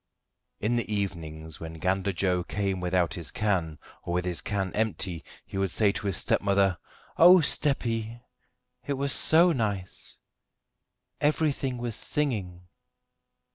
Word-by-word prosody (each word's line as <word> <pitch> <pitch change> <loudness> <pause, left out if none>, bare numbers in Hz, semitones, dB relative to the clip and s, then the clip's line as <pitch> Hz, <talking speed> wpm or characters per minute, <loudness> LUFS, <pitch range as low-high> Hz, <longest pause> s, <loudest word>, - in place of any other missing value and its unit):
In 120 +3 0
the 115 -2 -3
evenings, 80 -6 -4
when 80 0 -7
Gander 95 +4 0
Joe 90 -1 0
came 100 0 -2
without 90 0 0
his 85 -6 -3
can, 90 -7 -1 0.2
or 85 - -4
with 90 0 0
his 90 -2 -2
can 95 -3 -2
empty, 100 -6 -1 0.2
he 95 - -5
would 95 -1 +1
say 100 +3 +2
to 100 - -4
his 95 - 0
stepmother: 100 -2 +2 0.4
"Oh, 180 +2 +9
steppy! 120 -7 +1 0.6
it 145 - -2
was 140 +1 0
so 170 +3 +5
nice; 105 - -3 1.1
everything 145 -3 0
was 120 -2 -4
singing." 105 -13 -2
100 Hz, 135 wpm, -27 LUFS, 90-120 Hz, 1.1 s, Oh